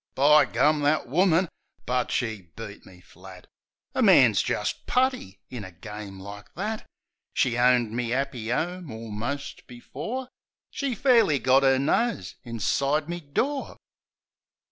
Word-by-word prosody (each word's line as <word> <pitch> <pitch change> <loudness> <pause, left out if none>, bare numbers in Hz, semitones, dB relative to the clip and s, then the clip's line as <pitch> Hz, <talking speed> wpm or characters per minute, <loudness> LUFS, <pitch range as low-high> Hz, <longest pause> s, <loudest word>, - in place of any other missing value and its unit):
By 145 +2 +6
gum; 150 +6 +2
that 145 -1 +1
woman! 175 +5 +3 0.4
But 125 0 0
she 110 -7 -3
beat 110 -2 -9
me 90 -1 -16
flat! 90 +1 -14 0.5
A - - 0
man's - - +6
jist - - -3
putty 255 - 0
in 125 -4 -6
a 95 - -9
game 100 +2 -9
like 100 +1 -10
that. 215 +4 -4 0.5
She 125 -3 +2
owned 120 -2 +3
me 120 0 -2
'appy 130 -3 -2
'ome 175 +5 -2
almost 115 +5 -6
before 155 - -6 0.4
She 275 -4 -2
fairly 230 - +4
got 130 +1 +3
'er 135 -1 +4
nose 150 - 0
inside 140 - 0
me 175 0 -3
door. 250 - -2
130 Hz, 135 wpm, -26 LUFS, 110-165 Hz, 0.5 s, By